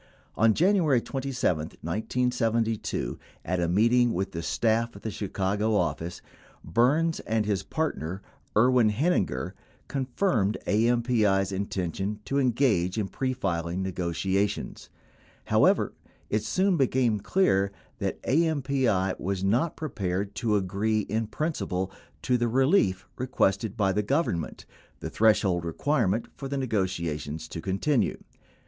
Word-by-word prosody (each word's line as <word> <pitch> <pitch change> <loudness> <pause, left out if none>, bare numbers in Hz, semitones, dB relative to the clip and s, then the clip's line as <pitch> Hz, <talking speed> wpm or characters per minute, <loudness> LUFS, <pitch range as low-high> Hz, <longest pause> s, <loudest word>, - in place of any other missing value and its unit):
12 - - -2
On - - +5
January 170 -8 +3
27, 130 - -1 0.2
1972, 115 - -1 0.3
at 90 +2 -1
a 85 - +1
meeting 115 +6 +3
with 95 +2 -2
the 85 -3 -4
staff 115 +6 0
of 100 - -12
the 110 - -3
Chicago 100 +2 -1
office, 85 -2 -2 0.4
Burns 150 +8 +2
and 110 -1 -1
his 100 -3 0
partner 95 - -3 0.3
Erwin 125 -1 +5
Heininger 105 - 0 0.4
confirmed 130 - 0
AMPI's 110 -3 +2
intention 95 +1 -3
to 140 - 0
engage 115 -8 +2
in 100 -3 -1
prefiling 95 -9 -2
negotiations. 95 +2 -2 0.6
However, - - +3 0.4
it 105 - +2
soon 185 - +1
became 125 -5 +2
clear 100 - +2 0.3
that - - -2
AMPI 135 - +1
was 95 +1 -2
not 120 +12 +1
prepared 100 - -3
to 110 -1 0
agree 100 +3 0
in 110 +2 -2
principle 100 - -2 0.3
to 125 -1 +2
the 120 - +1
relief 125 - +2
requested 110 -4 0
by 100 -3 +2
the 105 +2 +1
Government 105 - -1 0.2
— - - -31
the - - -6
threshold 100 -5 +3
requirement 110 - 0
for 135 - -5
the 140 +1 -3
nego 115 -8 +1
tiations 80 -4 -4
to 80 - -6
continue. 100 - 0
110 Hz, 125 wpm, -27 LUFS, 95-130 Hz, 0.6 s, On